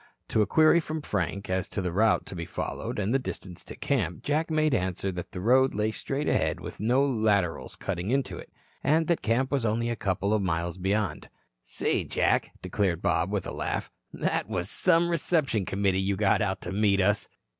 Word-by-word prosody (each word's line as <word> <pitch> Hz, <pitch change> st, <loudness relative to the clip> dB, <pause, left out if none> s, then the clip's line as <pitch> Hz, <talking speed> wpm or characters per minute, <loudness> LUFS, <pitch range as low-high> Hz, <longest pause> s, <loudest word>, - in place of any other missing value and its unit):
To 110 Hz, -, +2 dB
a 105 Hz, -, +2 dB
query 160 Hz, +7 st, +5 dB
from 155 Hz, -1 st, -4 dB
Frank 100 Hz, -, -2 dB
as 95 Hz, +1 st, -1 dB
to -, -, -3 dB
the 90 Hz, -2 st, -1 dB
route 110 Hz, +5 st, +3 dB
to -, -, -8 dB
be 85 Hz, -1 st, -5 dB
followed -, -, -4 dB
and 105 Hz, +3 st, 0 dB
the 135 Hz, -, +3 dB
distance 90 Hz, -8 st, -7 dB
to -, -, -9 dB
camp, 100 Hz, -, -1 dB
Jack 155 Hz, +3 st, 0 dB
made 155 Hz, -2 st, +2 dB
answer 95 Hz, -2 st, -1 dB
that 90 Hz, -1 st, -6 dB
the 90 Hz, -, -6 dB
road 130 Hz, +6 st, +4 dB
lay 105 Hz, +1 st, +1 dB
straight 135 Hz, +6 st, -3 dB
ahead -, -, +1 dB
with -, -, -8 dB
no 125 Hz, +7 st, +3 dB
laterals 105 Hz, -9 st, 0 dB
cutting 95 Hz, 0 st, -3 dB
into 135 Hz, +2 st, 0 dB
it, -, -, -12 dB, 0.3 s
and 160 Hz, +3 st, +3 dB
that 170 Hz, 0 st, +1 dB
camp 125 Hz, +4 st, +1 dB
was 140 Hz, -4 st, +1 dB
only 115 Hz, +2 st, 0 dB
a -, -, -1 dB
couple 100 Hz, 0 st, 0 dB
of 110 Hz, -, +2 dB
miles 85 Hz, -1 st, -2 dB
beyond. 95 Hz, -4 st, -1 dB, 0.3 s
"Say, -, -, -1 dB
Jack," -, -, +1 dB
declared 95 Hz, -5 st, -1 dB
Bob 85 Hz, +3 st, +1 dB
with 100 Hz, -3 st, -1 dB
a -, -, -4 dB
laugh, -, -, -3 dB, 0.2 s
"that -, -, -1 dB
was 90 Hz, +1 st, -2 dB
some 170 Hz, -2 st, +3 dB
reception 155 Hz, -, +1 dB
committee 95 Hz, 0 st, +1 dB
you 100 Hz, +1 st, 0 dB
got 100 Hz, +2 st, +2 dB
out 95 Hz, -2 st, -1 dB
to 85 Hz, -, -5 dB
meet 100 Hz, 0 st, +2 dB
us." 105 Hz, +2 st, +2 dB
105 Hz, 205 wpm, -27 LUFS, 95-130 Hz, 0.3 s, query